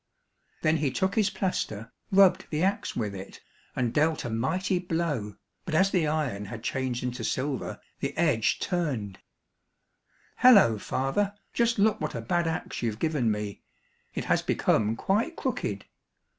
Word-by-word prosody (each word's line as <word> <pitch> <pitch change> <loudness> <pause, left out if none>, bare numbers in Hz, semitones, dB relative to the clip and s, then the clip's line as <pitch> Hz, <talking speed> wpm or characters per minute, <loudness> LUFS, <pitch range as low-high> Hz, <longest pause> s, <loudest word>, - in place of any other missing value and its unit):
Then 155 +1 +3
he 145 -2 +1
took 190 +8 0
his 210 -2 +2
plaster, 115 - -3 0.2
rubbed 190 -1 +5
the 155 +2 -1
axe 195 +2 0
with 105 -4 -2
it, 95 0 -9 0.4
and 120 -2 0
dealt 155 -1 +1
a 120 - -3
mighty 180 +11 0
blow, 160 - -2 0.3
but 165 - -3
as 195 +3 +4
the 170 -5 +2
iron 145 -10 -1
had 115 +3 -8
changed 130 -2 -2
into 125 -1 -3
silver, 130 +2 -2 0.2
the - - -3
edge 150 -10 +2
turned; 130 - -2 1.2
"Hollo, 195 - +7
father, 195 - -1 0.2
just 235 0 +2
look 210 +1 +3
what 155 - -3
a 115 - -3
bad 170 +9 0
axe 160 - -3
you've 115 -3 -1
given 145 -4 +1
me, 105 -1 -3 0.5
it - - -3
has - - +2
become 110 +1 +1
quite 220 - 0
crooked." 105 - -3
150 Hz, 155 wpm, -28 LUFS, 115-185 Hz, 1.2 s, Hollo